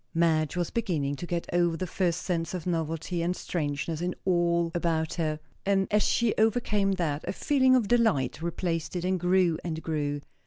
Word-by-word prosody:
Madge 160 -2 +2
was 175 -2 -1
beginning 160 -11 -1
to 175 - -6
get 170 -1 -2
over 175 -1 +2
the 185 - -2
first 180 0 -1
sense 170 -1 -2
of 175 - -5
novelty 165 0 -2
and 175 +2 0
strangeness 155 -1 -3
in 180 +1 -2
all 170 -2 +2
about 165 -1 0
her; 155 -3 -1 0.2
and, 195 -1 +2
as 210 0 +4
she 235 0 +2
overcame 215 -3 +2
that, 160 -6 -1
a - - 0
feeling 260 +4 +3
of 240 -5 +2
delight 220 - +2
replaced 170 0 -2
it, 175 0 -2
and 185 0 +1
grew 180 -2 +2
and 160 -2 -4
grew. 145 -2 -1
175 Hz, 185 wpm, -28 LUFS, 160-190 Hz, 0.2 s, as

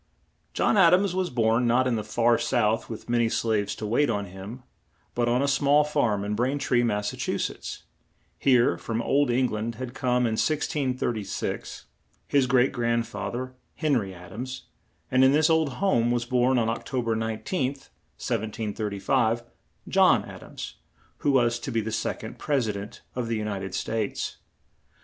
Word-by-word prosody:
John 215 - +2
Ad 180 -3 +7
ams 190 0 +1
was 185 -1 0
born, 115 0 +2
not 125 +2 +3
in 125 -2 +1
the 110 - -2
far 115 +2 +2
South 115 -3 +1
with 110 - -7
ma 120 0 +1
ny 115 - +3
slaves 110 -3 0
to 110 - -5
wait 120 +7 +2
on 100 0 -1
him, 100 +7 -9 0.5
but 120 0 +1
on 125 +3 +2
a - - +1
small 140 +1 +4
farm 120 -9 0
in 105 - -2
Brain 125 +6 0
tree, 125 -3 +2
Mass. 105 -3 0 1.3
Here, 125 -3 +3
from 115 +1 -3
old 140 +1 +2
Eng 125 +1 +2
land 110 +2 -3
had 125 +1 -6
come, 125 -2 +1
in 110 -1 +1
1636, 130 -8 -2 0.4
his 140 -2 +3
great 130 0 +3
grand 115 -2 0
fa 105 -3 -5
ther, 130 +2 -5 0.2
Hen 150 -2 +1
ry 100 -4 -2
Ad 90 0 -12
ams; 130 +4 -6 0.5
and 130 +1 +5
in 130 +1 +6
this 155 +2 +4
old 160 -4 +2
home 125 -10 +2
was 120 0 0
born 125 +1 +2
on 115 -2 +2
Oc 115 +1 -2
to 130 -2 -2
ber 115 -1 0
19th, 130 - -2 0.3
1735, 110 +1 -1 0.4
John - - +4
Ad - - -10
ams, - - -8 0.4
who - - 0
was 120 -3 +2
to 135 - -5
be 115 - +1
the 110 0 -3
sec - - -2
ond - - -8
Pres 135 -6 0
i - - +1
dent 100 +1 -8
of 125 -2 -3
the 115 - -1
U 110 -1 -2
nit 100 -2 -3
ed 95 -1 -5
States. 110 -2 -2
120 Hz, 185 wpm, -26 LUFS, 110-130 Hz, 1.3 s, Ad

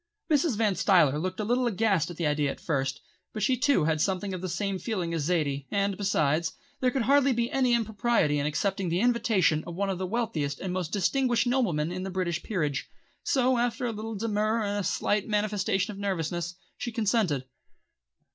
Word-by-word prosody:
Mrs. 290 -5 +2
Van 215 -3 +2
Stuyler 170 -5 +4
looked 185 +2 -3
a - - 0
little 245 +3 +1
aghast 200 -6 +1
at 175 - -8
the 170 - -1
idea 150 -1 +1
at - - -5
first, 135 -3 -2 0.3
but 215 - -3
she 255 +4 +3
too 280 - +2
had 155 -1 +1
something 195 +1 -1
of 185 - -5
the 185 - -3
same 190 +3 -2
feeling 180 -7 -2
as 160 -3 -1
Zaidie, 145 -5 0
and 200 -1 0
besides, 160 -5 +1 0.3
there 255 - +3
could 250 -1 -1
hardly 275 +2 +4
be 235 0 -1
any 255 -3 +3
impropriety 220 -8 +1
in 145 - 0
accepting 190 +5 -1
the 170 +2 0
invitation 225 -9 +2
of 170 - -6
one 195 +1 0
of 185 - -4
the 185 - -2
wealthiest 175 -10 -2
and 185 -2 -3
most 180 -3 -3
distinguished 240 +5 +1
noblemen 190 - +1
in 185 +1 -4
the 190 - -4
British 180 -3 -2
Peerage. 150 -9 -2 0.3
So, 255 -2 +2
after 245 +1 0
a 235 - 0
little 220 +1 -5
demur 215 +1 0
and 205 0 -1
a - - -2
slight 205 +2 0
manifestation 205 -1 0
of 200 - -9
nervousness, 175 -3 -2 0.2
she 240 - -4
consented. 210 - +1
195 Hz, 200 wpm, -28 LUFS, 170-230 Hz, 0.3 s, Stuyler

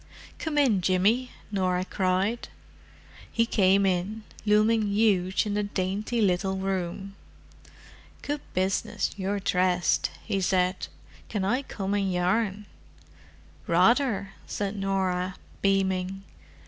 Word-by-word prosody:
"Come 315 -2 -3
in, 245 -10 +4
Jimmy," 200 +8 +2 0.2
Norah 185 -2 0
cried. 190 +5 0 0.8
He 230 - +2
came 195 -3 +3
in, 195 +4 -1 0.2
looming 215 +1 +4
huge 200 -3 +2
in 205 - -2
the 210 - +1
dainty 205 +3 -2
little 190 -1 +1
room. 190 0 -3 1.1
"Good 290 0 -3
business—you're 195 +1 -1
dressed," 180 -1 +2 0.2
he 195 - -1
said. 185 0 +1 0.4
"Can 205 -4 -1
I 245 +7 +1
come 200 -7 -4
and 200 -2 +1
yarn?" 195 +3 0 1.0
"Rather," 200 +2 +3
said 200 0 -3
Norah, 190 -2 -1 0.3
beaming. 195 -1 0
195 Hz, 105 wpm, -27 LUFS, 185-210 Hz, 1.1 s, in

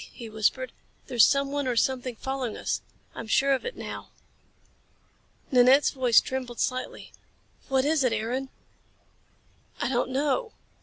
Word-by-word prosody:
he 235 - -8
whispered. 220 +4 0 0.3
"There's 240 -3 +4
someone 280 0 0
or 250 - 0
something 255 0 0
following 265 -2 -4
us. - - -2 0.3
I'm 225 - -7
sure 275 +5 +3
of 265 - -2
it 485 - -6
now." - - -7 1.4
Nanette's 260 +3 +6
voice 255 -4 +5
trembled 255 -2 -5
slightly. 255 0 -3 0.6
"What 265 0 +2
is 300 -1 +2
it, 250 - +2
Aaron?" 240 +5 -2 1.3
"I - - -1
don't 250 -1 0
know." 295 - 0
260 Hz, 135 wpm, -27 LUFS, 245-275 Hz, 1.4 s, Nanette's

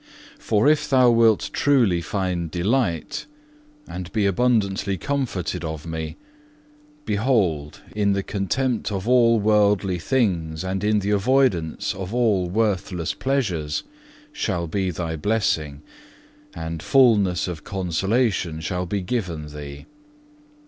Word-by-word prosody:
"For 105 +4 +2
if 150 -1 +3
thou 130 -3 +5
wilt 115 -2 +3
truly 120 -12 +3
find 90 -3 -2
delight, 90 - -1 0.6
and 90 0 -7
be 105 -2 +1
abundantly 100 -2 +1
comforted 95 - -2
of 80 -2 -5
Me, 80 -1 -5 0.9
behold 100 - 0
in 100 -1 +2
the 100 0 -1
contempt 110 +5 -1
of 95 +1 -3
all 120 -2 +5
worldly 105 -3 +2
things 85 -8 0
and 95 +1 -3
in 105 0 +2
the 100 +1 -1
avoidance 105 - +1
of 95 +4 -6
all 105 -7 +2
worthless 95 -4 -1
pleasures 95 - -1 0.5
shall 95 - -2
be 95 +3 -1
thy 80 -1 -3
blessing, 75 -6 -1 0.7
and 80 0 -5
fulness 105 - +3
of 85 -4 -6
consolation 95 -1 -1
shall 90 +2 -3
be 100 +1 -2
given 85 -9 -3
thee. 70 -1 -8
95 Hz, 120 wpm, -23 LUFS, 85-115 Hz, 0.9 s, thou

